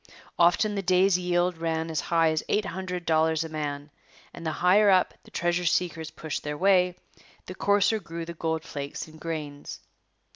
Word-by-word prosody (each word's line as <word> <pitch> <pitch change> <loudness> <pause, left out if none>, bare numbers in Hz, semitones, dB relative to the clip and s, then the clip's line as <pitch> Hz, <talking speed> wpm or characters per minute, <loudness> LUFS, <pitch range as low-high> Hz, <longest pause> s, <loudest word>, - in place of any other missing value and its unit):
Often 175 +5 +4
the 200 - -2
day's 185 0 +3
yield 175 -1 0
ran 165 0 -2
as 160 - -1
high 165 -1 +2
as 155 - 0
eight 210 0 +1
hundred 180 -1 -5
dollars 160 0 +2
a 160 - -7
man; 145 -1 -4 0.4
and 170 - -10
the 160 - -1
higher 200 +4 +4
up 185 -2 +4
the - - -15
treasure 175 +1 0
seekers 165 -2 0
pushed 155 -2 -5
their 150 0 -4
way, 180 -1 +3 0.5
the 185 - -7
coarser 205 +3 +2
grew 165 -3 -7
the 170 - -7
gold 160 -1 -2
flakes 140 +1 -6
and 155 0 -15
grains. 150 -3 -6
170 Hz, 180 wpm, -27 LUFS, 160-180 Hz, 0.5 s, Often